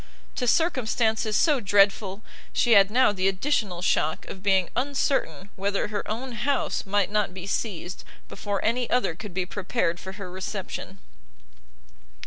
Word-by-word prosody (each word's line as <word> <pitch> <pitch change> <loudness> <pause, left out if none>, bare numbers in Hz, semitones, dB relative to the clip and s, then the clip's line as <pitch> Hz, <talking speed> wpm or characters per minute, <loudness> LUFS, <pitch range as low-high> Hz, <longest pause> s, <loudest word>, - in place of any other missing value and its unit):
To 250 -3 -1
circumstances 225 -8 +1
so 300 -5 +3
dreadful, 200 0 +2 0.3
she 240 - +2
had 200 -3 +7
now 250 0 +4
the 190 -1 0
additional 195 -3 0
shock 155 -3 +1
of 190 - -8
being 190 -2 +2
uncertain 250 - -1
whether 200 +1 -1
her 210 -1 -4
own 245 +5 -4
house 255 -1 -1
might 200 0 +1
not 210 -3 0
be 185 -1 -6
seized, 190 -3 -3 0.2
before 205 -2 -4
any 240 +2 +1
other 250 -9 +1
could 190 +1 -9
be 185 -1 0
prepared 185 -2 -1
for 190 - -8
her 190 -2 -8
reception! 190 0 -5
205 Hz, 145 wpm, -26 LUFS, 190-235 Hz, 0.3 s, had